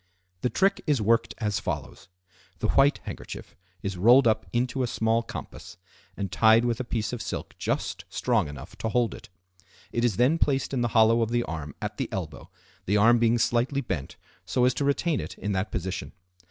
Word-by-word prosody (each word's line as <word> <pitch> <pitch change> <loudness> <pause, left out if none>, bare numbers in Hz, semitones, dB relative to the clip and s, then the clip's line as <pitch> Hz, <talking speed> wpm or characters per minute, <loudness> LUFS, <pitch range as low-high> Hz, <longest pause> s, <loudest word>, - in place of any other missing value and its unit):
The 125 - +1
trick 195 +7 +2
is 145 -4 +3
worked 115 +2 +2
as 105 -3 -1
follows:—The 90 +2 -7
white 140 +1 +4
handkerchief - - -8 0.3
is 95 -1 -3
rolled 120 +7 +6
up 110 - +1
into 125 +2 0
a 125 - +1
small 115 0 +1
compass 115 - -9 0.4
and 100 -3 -3
tied 110 +3 +5
with 120 -1 0
a - - -1
piece 115 -1 -2
of 120 - -4
silk - - -5
just - - -2
strong - - +1
enough 75 +4 -9
to 110 - -2
hold 120 0 +1
it. 115 0 -12 0.6
It 120 - -1
is 120 -5 +2
then 140 +7 +3
placed 135 -1 +1
in 130 - 0
the 120 - +2
hollow 115 +1 +5
of 115 - +1
the 120 0 +1
arm 75 -7 -6
at - - -4
the - - -2
elbow, - - -6 0.4
the 100 +3 +3
arm 115 +3 +5
being 115 0 +3
slightly 120 +4 +1
bent 80 - -4 0.3
so 125 - +1
as 125 - +3
to 140 - -1
retain 145 +2 +1
it - - -7
in 105 - -3
that 95 +1 -1
position. 95 +1 -4
115 Hz, 195 wpm, -26 LUFS, 100-125 Hz, 0.6 s, rolled